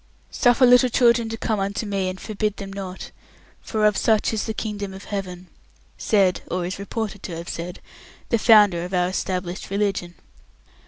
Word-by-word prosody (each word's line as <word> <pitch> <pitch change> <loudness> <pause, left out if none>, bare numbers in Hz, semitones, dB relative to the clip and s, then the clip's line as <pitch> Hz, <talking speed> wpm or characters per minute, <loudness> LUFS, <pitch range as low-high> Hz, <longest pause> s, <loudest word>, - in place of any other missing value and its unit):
"Suffer 245 +1 +4
little 250 0 +6
children 235 -1 +3
to 225 - -4
come 220 -2 -1
unto 200 +3 -2
Me, 195 -2 -1
and 185 0 -7
forbid 210 -1 -3
them 195 -1 -7
not, 190 -2 -7 0.5
for 215 -1 -1
of 210 -1 +4
such 220 +1 +2
is 215 - -1
the 220 - -2
Kingdom 205 -3 -4
of 190 - -10
Heaven," 185 -3 -5 0.5
said, 195 -5 +2
or 180 0 -2
is 185 +2 -5
reported 205 0 -4
to 170 -3 -6
have 170 +1 -8
said, 175 +1 -6 0.5
the 230 - +2
Founder 205 -7 +5
of 180 +2 -4
our 180 0 +2
Established 185 -1 -3
Religion. 195 -3 -1
200 Hz, 175 wpm, -23 LUFS, 185-220 Hz, 0.5 s, little